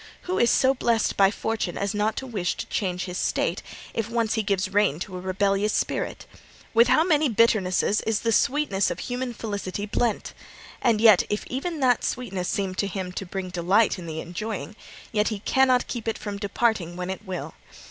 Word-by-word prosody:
Who 365 +1 -1
is 240 - +4
so 265 0 +4
blest 235 -4 +1
by 195 -1 +5
Fortune 220 -4 -3
as 200 +1 -1
not 210 +1 0
to 265 - -4
wish 200 -9 -2
to - - -5
change 180 -3 -2
his 180 -1 -4
state, - - 0 0.3
if 225 -1 -2
once 230 -2 0
he 220 - +1
gives 195 -2 -1
rein 205 -8 +3
to 190 -1 -5
a - - -4
rebellious 195 +2 +1
spirit? - - -2 0.5
With 235 +1 +6
how 315 - +5
many 310 -4 +3
bitternesses 215 -3 +2
is 220 -2 +1
the 230 - +1
sweetness 240 -5 +2
of - - -3
human 245 +5 -3
felicity 205 -3 -4
blent! 220 +1 -1 0.5
And 230 -4 +3
even 215 -5 +6 0.5
if 300 - -6
that 250 -3 +3
sweetness 195 -8 -2
seem 195 -2 -1
to 200 +2 -1
him 190 -1 -4
to 185 +1 -5
bring 185 0 -4
delight 185 +4 +2
in 170 - -8
the 160 0 -4
enjoying, 215 +5 -5 0.4
yet 210 -1 +1
he 215 - -1
cannot 255 +4 +3
keep 235 -2 -5
it 225 - -1
from 205 -1 -5
departing 205 -4 0
when 180 +1 -3
it 190 - -6
will. 185 -3 -5
210 Hz, 195 wpm, -25 LUFS, 190-230 Hz, 0.5 s, With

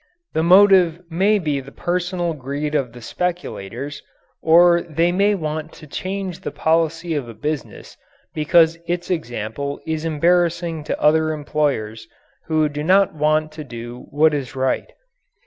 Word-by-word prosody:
The 160 - +1
motive 180 -1 +6
may 195 +6 +3
be 150 -7 -1
the 135 0 -11
personal 175 0 -2
greed 145 +1 -4
of 135 -5 0
the 120 0 -12
speculators 140 - -4 0.4
or 170 +1 +5
they 170 +1 0
may 200 +3 +2
want 155 -2 -4
to 155 - -13
change 185 +3 -5
the 190 - -5
policy 165 +1 0
of 140 -6 -3
a 115 - -10
business 150 +6 -5 0.4
because 165 +1 +3
its 175 +1 -2
example 140 -2 -3
is 160 -1 -2
embarrassing 170 0 +1
to - - -3
other 155 +1 +3
employers 140 -8 -2 0.4
who 155 -1 +2
do 150 0 -5
not 195 +4 +4
want 155 0 +1
to 155 0 -8
do 120 -1 -9
what 155 +2 +3
is 140 -1 -4
right. 130 - -1
155 Hz, 145 wpm, -21 LUFS, 145-175 Hz, 0.4 s, motive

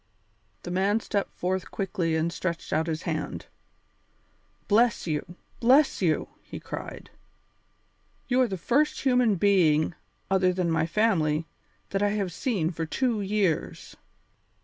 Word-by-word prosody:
The 175 - -5
man 195 +4 +2
stepped 200 -2 -2
forth 185 +1 -2
quickly 180 -4 -1
and 165 +1 0
stretched 170 -2 -3
out 160 +2 +1
his 160 -1 -3
hand. 155 -3 -3 1.2
"Bless 230 +3 +3
you! 160 +2 -3 0.2
Bless 265 +3 +4
you!" 165 -4 +1
he - - -9
cried. - - -8 1.2
"You 255 0 +3
are 255 - +3
the 195 -3 -4
first 280 - +1
human 250 -5 +3
being, 170 -5 +3 0.4
other 185 -1 +3
than 180 -2 0
my 160 0 +1
family, 165 -6 +1 0.5
that 195 - 0
I 205 - +3
have 195 -5 -2
seen 185 -7 -1
for 165 -2 -4
two 235 +3 0
years." 195 -5 -1
185 Hz, 135 wpm, -27 LUFS, 165-215 Hz, 1.2 s, Bless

